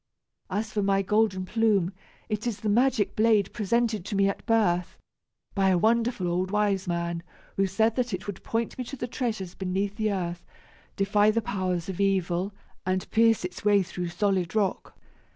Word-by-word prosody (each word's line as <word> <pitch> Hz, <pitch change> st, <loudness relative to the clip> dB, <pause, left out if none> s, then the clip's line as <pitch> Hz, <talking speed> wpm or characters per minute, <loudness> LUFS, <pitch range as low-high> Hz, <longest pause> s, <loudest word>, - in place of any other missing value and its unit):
As 210 Hz, +3 st, -2 dB
for 210 Hz, -, +1 dB
my 195 Hz, 0 st, +2 dB
golden 205 Hz, -2 st, +1 dB
plume 205 Hz, -3 st, +2 dB, 0.3 s
it 215 Hz, +2 st, -2 dB
is 225 Hz, -4 st, -3 dB
the 215 Hz, -, -1 dB
magic 240 Hz, -1 st, +2 dB
blade 215 Hz, -3 st, +3 dB
presented 220 Hz, -1 st, 0 dB
to 205 Hz, -, -3 dB
me 195 Hz, 0 st, +4 dB
at 200 Hz, -, -3 dB
birth, 180 Hz, -7 st, +2 dB, 0.6 s
by 195 Hz, -1 st, +3 dB
a 185 Hz, -, +4 dB
wonderful 230 Hz, -1 st, +2 dB
old 180 Hz, +2 st, 0 dB
wiseman, 185 Hz, -5 st, 0 dB, 0.3 s
who 195 Hz, 0 st, +2 dB
said 220 Hz, +4 st, +1 dB
that 245 Hz, -1 st, 0 dB
it 185 Hz, -1 st, -4 dB
would 205 Hz, -2 st, -6 dB
point 230 Hz, +2 st, -2 dB
me -, -, -1 dB
to 275 Hz, -, -6 dB
the 240 Hz, -, -4 dB
treasures 220 Hz, -8 st, -3 dB
beneath 195 Hz, +2 st, -2 dB
the 215 Hz, -1 st, +1 dB
earth, 175 Hz, -3 st, -3 dB, 0.5 s
defy 205 Hz, +1 st, +3 dB
the 220 Hz, +2 st, +2 dB
powers 185 Hz, -6 st, -2 dB
of 190 Hz, 0 st, -3 dB
evil, 190 Hz, -1 st, +1 dB, 0.3 s
and 185 Hz, 0 st, -2 dB
pierce 225 Hz, -3 st, +4 dB
its 180 Hz, -, -7 dB
way 205 Hz, -1 st, +4 dB
through 180 Hz, 0 st, -5 dB
solid 185 Hz, +1 st, 0 dB
rock. 205 Hz, -3 st, -1 dB
200 Hz, 175 wpm, -27 LUFS, 185-220 Hz, 0.6 s, me